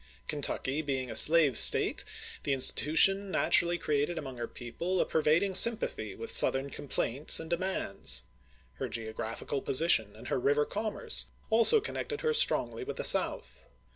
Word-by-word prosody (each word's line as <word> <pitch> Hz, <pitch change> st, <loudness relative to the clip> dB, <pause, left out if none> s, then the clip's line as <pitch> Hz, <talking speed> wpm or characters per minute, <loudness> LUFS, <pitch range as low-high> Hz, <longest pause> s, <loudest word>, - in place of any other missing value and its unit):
Kentucky 145 Hz, -1 st, -2 dB
being 135 Hz, -4 st, -4 dB
a -, -, -8 dB
slave 150 Hz, +1 st, +5 dB
State, -, -, +5 dB, 0.4 s
the 140 Hz, -, -2 dB
insti 130 Hz, -1 st, +4 dB
tution 195 Hz, +6 st, +2 dB
natui^ally 175 Hz, -1 st, +2 dB
created 150 Hz, +3 st, -2 dB
among 130 Hz, -2 st, -8 dB
her 120 Hz, -1 st, -5 dB
people 170 Hz, +10 st, -5 dB
a -, -, +1 dB
per 160 Hz, -, -2 dB
vading 175 Hz, +6 st, +1 dB
sympathy 230 Hz, +3 st, +1 dB
with 455 Hz, -, -6 dB
Southern 135 Hz, +1 st, +2 dB
complaints 140 Hz, -1 st, 0 dB
and 160 Hz, +1 st, -9 dB
demands. 130 Hz, -, -2 dB, 0.6 s
Her -, -, -4 dB
geographical 115 Hz, +4 st, -5 dB
position 120 Hz, -8 st, +1 dB
and 110 Hz, -, -11 dB
her -, -, -2 dB
river 145 Hz, +3 st, 0 dB
commerce 215 Hz, 0 st, -4 dB, 0.2 s
also 230 Hz, -, +6 dB
connected 440 Hz, +2 st, -6 dB
her 465 Hz, -1 st, -1 dB
strongly 455 Hz, -2 st, 0 dB
with 440 Hz, +3 st, -8 dB
the -, -, -4 dB
South. -, -, +1 dB
150 Hz, 155 wpm, -29 LUFS, 130-190 Hz, 0.6 s, also